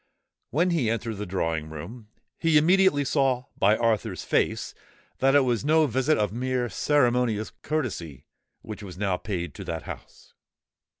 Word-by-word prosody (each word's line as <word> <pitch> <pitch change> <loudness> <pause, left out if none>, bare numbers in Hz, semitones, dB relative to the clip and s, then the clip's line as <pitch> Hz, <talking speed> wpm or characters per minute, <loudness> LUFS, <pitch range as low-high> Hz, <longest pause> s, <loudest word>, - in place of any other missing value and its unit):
When 175 +5 +1
he 145 -10 +1
entered 115 -1 -2
the 105 0 -5
drawing 80 -4 -2
room, 100 +10 -9 0.3
he 165 -2 +4
immediately 175 -2 +4
saw 130 -3 +1
by 105 +3 +3
Arthur's 115 -4 0
face - - 0 0.5
that 135 +1 +3
it 145 - +7
was 125 -3 0
no 155 +2 +4
visit 130 +4 +1
of 105 -1 0
mere 125 0 -1
ceremonious 120 -4 +1
courtesy 95 - -3 0.4
which 105 -1 -8
was 95 -4 -9
now 95 -2 0
paid 90 -7 -4
to - - -8
that 80 -1 -4
house. - - -11
120 Hz, 155 wpm, -26 LUFS, 100-145 Hz, 0.5 s, it